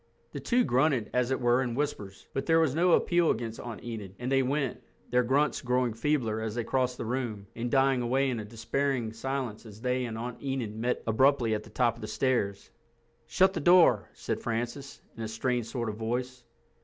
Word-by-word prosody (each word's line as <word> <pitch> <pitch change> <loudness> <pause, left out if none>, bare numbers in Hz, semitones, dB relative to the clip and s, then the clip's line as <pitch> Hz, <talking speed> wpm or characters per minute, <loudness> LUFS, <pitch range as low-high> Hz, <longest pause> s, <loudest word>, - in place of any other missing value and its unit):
The 140 - -5
two 240 - +2
grunted 130 -3 +1
as 125 0 +1
it 130 - 0
were 120 0 +3
in 120 -3 -2
whispers, 105 -9 -4
but 135 - -3
there 165 0 +5
was 160 -5 +2
no 175 +3 +3
appeal 175 -2 +3
against 115 -2 -2
Aunt 120 -3 -7
Enid, 105 -5 -6
and 125 +2 -4
they 135 0 +4
went, 135 0 -1 0.3
their 125 0 +4
grunts 135 +5 +1
growing 125 -2 +1
feebler 115 -3 0
as 110 -1 -3
they 120 - -1
crossed 125 +1 0
the - - -4
room, 115 -4 -3
and 120 +1 -3
dying 135 0 +3
away 130 +3 +1
in 120 - -2
a - - -4
despairing 115 +2 -2
silence 125 -2 -4
as 110 -2 -12
they 125 +1 0
and 110 -2 -5
Aunt 120 +1 -6
Enid 130 -6 -3
met 120 +3 -1
abruptly 120 0 +3
at 105 - -1
the - - -14
top 120 -3 +2
of - - -12
the 110 - -5
stairs. 110 -4 -1 0.6
"Shut 190 0 +3
the 175 - -2
door," 165 - +5
said - - -3
Francis, 120 +4 -4
in 115 - -8
a 110 - -2
strained 115 +1 -1
sort 115 0 -3
of 105 -1 -4
voice. 125 +2 -3
125 Hz, 210 wpm, -29 LUFS, 115-135 Hz, 0.6 s, there